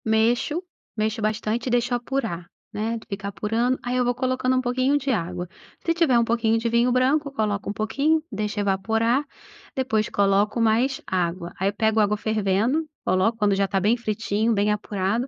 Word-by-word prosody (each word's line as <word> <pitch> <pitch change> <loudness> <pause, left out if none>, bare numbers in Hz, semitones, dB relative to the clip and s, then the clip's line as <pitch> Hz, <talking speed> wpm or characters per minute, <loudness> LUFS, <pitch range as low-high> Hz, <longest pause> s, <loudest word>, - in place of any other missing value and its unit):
Mexo, 235 +9 +1 0.3
mexo 215 +1 -1
bastante 215 +2 -1
e - - +1
deixo 245 +1 +1
apurar, 235 -8 -2 0.3
né, 225 +2 -2
de 225 - -12
ficar 200 0 -5
apurando, 225 +5 0
aí 245 +1 -2
eu 250 - +3
vou 245 0 0
colocando 255 0 0
um 255 - +2
pouquinho 255 +3 +1
de 275 -1 -1
água. 180 -4 -2 0.4
Se 335 - +2
tiver 325 -8 +3
um 235 - +4
pouquinho 230 -1 +1
de 230 +1 -1
vinho 235 +2 +3
branco, 275 +4 +2
coloco 210 -6 -2
um - - -2
pouquinho, 280 +10 +1
deixo 210 0 -3
evaporar, 225 +6 +1 0.5
depois 220 -5 0
coloco 205 +2 +2
mais 235 +4 +2
água. 175 -1 -2
Aí 195 +2 +1
pego 220 +1 +1
água 210 0 +2
fervendo, 220 +7 +1 0.2
coloco 185 +5 +2
quando 210 -2 +2
já 195 0 +2
está 195 0 0
bem 210 +5 +3
fritinho, 220 -1 -1
bem 210 0 +2
apurado 210 +3 -1
225 Hz, 180 wpm, -24 LUFS, 205-250 Hz, 0.5 s, um